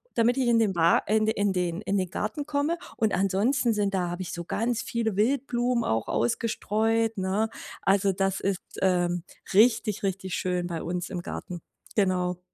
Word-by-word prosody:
damit 240 +2 +3
ich 255 -2 +1
in 230 - +4
den 210 -4 +2
Wa 170 0 +5
in 215 +1 +3
den 190 -4 0
in 200 -1 -1
den 185 -2 -1
Garten 220 +8 -3
komme. 300 +3 0 0.2
Und 220 -2 +1
ansonsten 215 +7 +2
sind 200 -2 0
da 180 -2 0
habe 175 +2 -4
ich 180 - -6
so 170 -1 -5
ganz 230 +3 -1
viele 220 -4 -2
Wildblumen 245 0 +1
auch 110 0 0
ausgestreut, 225 - 0
ne? 195 +4 0 0.3
Also, 195 0 +3
das 195 0 0
ist, 195 -1 -1 0.2
ähm, 175 -2 +1 0.3
richtig, 220 -1 +4
richtig 190 -1 -2
schön 180 -1 -1
bei 165 -2 -4
uns 180 0 -3
im 180 -3 -4
Garten. 175 -1 -6 0.4
Genau. 180 -2 +1
200 Hz, 170 wpm, -27 LUFS, 180-225 Hz, 0.4 s, Wa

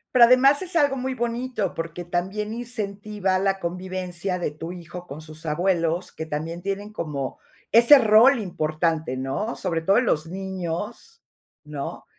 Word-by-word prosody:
Pero 240 -1 +9
además 270 +5 +5
es 365 -1 -1
algo 285 -4 +3
muy 260 0 -3
bonito, 235 -3 -2
porque 165 +1 -5
también 195 +5 -2
incentiva 210 -5 -2
la 195 0 0
convivencia 180 +1 -3
de 170 -4 -2
tu 165 +3 -7
hijo 175 0 -9
con 145 +3 -8
sus 155 +1 -11
abuelos, 170 +1 0
que 160 - -7
también 160 +3 -4
tienen 200 +2 -4
como 145 -7 -4 0.3
ese 235 +6 +8
rol 235 +3 +6
importante, 155 - -1
¿no? 135 - -3
Sobre 165 -4 -2
todo 195 +6 +3
en 250 - +3
los 155 -4 0
niños, 190 - -5 0.4
¿no? 150 -2 -6
185 Hz, 155 wpm, -24 LUFS, 165-225 Hz, 0.4 s, Pero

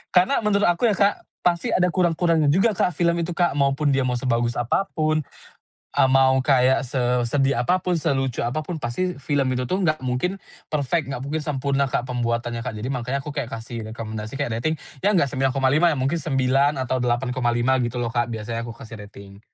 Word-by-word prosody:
Karena 185 +10 +4
menurut 210 -1 +2
aku 175 +7 +2
ya 205 - +1
Kak, 200 +1 +3 0.3
pasti 170 -1 +1
ada 180 - +3
kurang-kurangnya 170 -3 +2
juga 195 +8 +3
Kak, 180 - +1
film 170 +2 +1
itu 170 +1 -3
Kak. 175 -3 +2
Maupun 140 +1 +2
dia 135 -1 +2
mau 125 -1 0
sebagus 120 -1 0
apapun, 155 +4 0 0.7
eee, - - +4
mau 130 0 +4
kayak 130 -1 +3
sesedih 125 +2 +1
apapun, 180 +5 +1
selucu 135 -5 -1
apapun, 155 +7 -3
pasti 180 +10 -2
film 140 -1 0
itu 125 0 -1
tuh 185 +9 -1
enggak 155 -3 +1
mungkin 130 +10 -1 0.3
perfect, 145 0 -1
enggak 130 - -4
mungkin 155 +3 -2
sempurna 140 -2 0
Kak, 125 - -1
pembuatannya 120 -1 -2
Kak. 110 - -5
Jadi, 110 +4 -4
makanya 125 +2 -2
aku 150 - -5
kayak 135 -5 -3
kasih 115 -1 -6
rekomendasi, 110 -1 -6
kayak 115 -5 -2
rating 155 +4 0 0.3
ya 205 - +4
enggak 155 -7 +3
9,5 135 +4 +2
ya - - -2
mungkin 135 +6 0
9 135 0 +2
atau 130 0 -1
8,5 125 0 +1
gitu 120 +1 -3
loh 120 -1 -2
Kak, 120 +1 0
biasanya 115 +1 -4
aku 115 - -6
kasih 115 -1 -10
rating. 100 -1 -14
135 Hz, 185 wpm, -23 LUFS, 120-155 Hz, 0.7 s, Karena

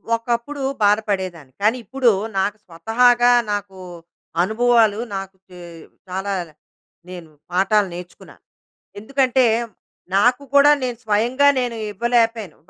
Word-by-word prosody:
ఒకప్పుడు 235 +5 -4 0.2
బాధ 205 0 +5
పడేదాన్ని. 175 -9 -4
కానీ 215 +4 +2
ఇప్పుడు 255 +3 +1 0.3
నాకు 205 +2 -1
స్వతహాగా 240 +8 +3 0.2
నాకు 200 -2 -5 0.6
అనుభవాలు 220 0 +2 0.2
నాకు 195 0 -6 0.7
చాలా 195 +2 -3 0.8
నేను 175 -3 -10 0.2
పాఠాలు 195 +3 +2
నేర్చుకున్నా. 180 0 -11 0.6
ఎందుకంటే, 260 +3 +1 0.7
నాకు 245 +7 +3
కూడా 285 +1 +7
నేను 250 -2 -3
స్వయంగా 235 +7 +2
నేను 245 -2 -3 0.2
ఇవ్వలేకపోయాను. 230 -3 0
220 Hz, 100 wpm, -20 LUFS, 195-245 Hz, 0.8 s, కూడా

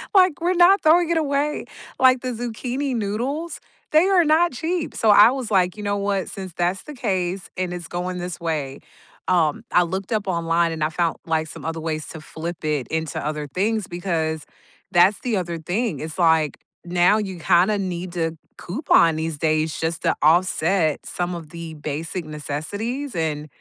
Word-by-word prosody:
like, 365 -5 +5
we're 355 +2 +2
not 365 +3 +6
throwing 335 +2 +5
it 335 - +2
away, 290 0 0 0.3
like, 255 -1 +5
the 255 - -3
zucchini 245 +3 -3
noodles? 245 +11 -3 0.3
They 310 +4 +5
are 370 -3 +4
not 320 +3 +4
cheap, 325 +4 -2
so 220 - +4
I 205 +2 +8
was 260 -4 -4
like, 185 0 +2
"You 210 - -6
know 205 0 0
what? 200 -1 -1
Since 190 -3 -7
that's 180 +2 0
the 300 -2 -9
case 185 -5 -2
and 185 -1 -2
it's 175 -2 -7
going 180 +1 -3
this 175 0 -5
way" 155 -5 -3 0.5
um, 165 -5 +2
I 180 - +5
looked 190 +4 -4
up 210 -2 -1
online, 170 -1 +1
and 160 - -3
I 155 - +1
found, 165 +1 -1
like, 160 -1 +1
some - - -9
other 165 0 -3
ways 155 -1 -3
to 160 - -8
flip 165 +1 -7
it 150 -4 -1
into 160 -2 -2
other 150 -1 -3
things 205 +6 -1
because 165 -3 -2 0.5
that's 185 +3 +5
the 235 -5 0
other 170 -2 -3
thing, 200 +8 -2
it's 155 +2 -6
like, 160 -4 +3 0.3
now 180 +4 +3
you 190 -4 -4
kinda 180 +5 +3
need 180 -2 -4
to 165 -2 -2 0.2
coupon 175 - +3
these 160 -1 -3
days 155 0 0
just 160 -1 -2
to - - +3
offset 165 0 +2
some 180 0 -3
of 165 -3 -8
the 170 -1 -7
basic 155 +4 -4
necessities, 200 - -4
and 155 -2 -2
180 Hz, 185 wpm, -22 LUFS, 160-225 Hz, 0.5 s, I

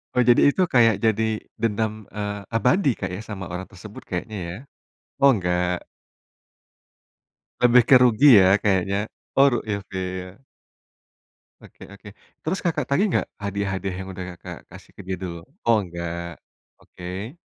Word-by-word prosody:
Oh - - +2
jadi 120 - +6
itu 190 - -1
kayak 115 -4 +5
jadi 110 0 +2 0.4
dendam, 110 -1 0 0.2
eee, 105 -1 -3 0.2
abadi 135 - +3
Kak - - -3
ya - - -6
sama 95 -3 -5
orang 90 +1 -5
tersebut 105 +2 -11
kayaknya 105 +4 -4
ya? 85 - -6 0.7
Oh 140 - +7
enggak. 90 -3 -1 1.8
Lebih 125 0 +6
ke 135 - +9
rugi 125 +3 +5
ya 95 +2 +5
kayaknya, 100 0 0 0.3
oh 135 -3 +4
ilfil. 95 -1 -5 1.2
Oke - - -15
oke, 100 +1 -15 0.3
terus 180 +5 -2
Kakak 170 - 0
tagih 170 +9 +2
enggak - - 0 0.2
hadiah-hadiah 95 -1 -3
yang 95 - -8
udah 90 0 -6
Kakak 85 - -10
kasih - - -14
ke - - -8
dia 95 - -2
dulu? 85 -2 -5 0.3
Oh 115 -1 +5
enggak, 85 -2 -6 0.4
oke. 95 - -8
100 Hz, 140 wpm, -23 LUFS, 90-115 Hz, 1.8 s, ke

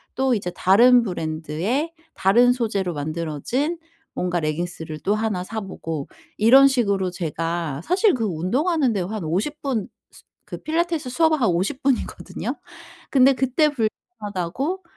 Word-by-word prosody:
또 265 -1 +2
이제 180 -4 -3
다른 240 +6 +5
브랜드의 175 - -2 0.2
다른 240 +6 +4
소재로 200 -7 -1
만들어진 165 - -2 0.4
뭔가 180 -1 -1
레깅스를 160 0 -4
또 205 - +1
1 215 -4 -1
사 220 +4 -5
보고 165 -6 -5 0.3
이런 265 +6 +7
식으로 200 -8 +1
제가 165 -3 -3
사실 370 +4 +3
그 230 - -2
운동하는데 235 - 0
한 205 0 -4
50 205 - -2
분 250 -8 -2 0.2
스 - - -16 0.2
그 - - -7
필라테스 325 -3 -1
수업 320 +2 +3
한 250 - 0
50 190 +11 -1
분이거든요. 270 -2 -2 0.6
근데 270 0 +6
그때 265 +4 +2
불편하다고 225 - -4
215 Hz, 275 characters per minute, -22 LUFS, 175-270 Hz, 0.6 s, 이런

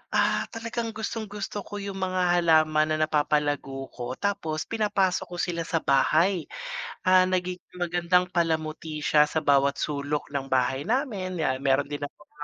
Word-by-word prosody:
ah, - - +2
talagang 230 0 -4
gustong-gusto 210 -1 -4
ko - - -7
yung 195 -1 -5
mga 185 -1 +2
halaman 155 -2 +3
na 155 - +1
napapalago 145 -3 0
ko, 125 +1 -5
tapos 170 -6 -2
pinapasok 205 -4 0
ko 175 - -8
sila 170 -1 -2
sa 165 -2 -1
bahay. 155 +6 +3 0.6
Ah, 185 0 +7
nagiging 180 -1 -2
magandang 175 +1 +2
palamuti 160 -2 -1
siya 150 0 +4
sa - - 0
bawat 140 -2 +3
sulok 145 0 -2
ng 135 -1 -3
bahay 130 +1 +1
namin. 205 - -1
Yan, 135 -4 0
meron 135 +1 +2
din 145 0 -6
na 145 - -3
mga 150 - -23
165 Hz, 155 wpm, -26 LUFS, 145-185 Hz, 0.6 s, Ah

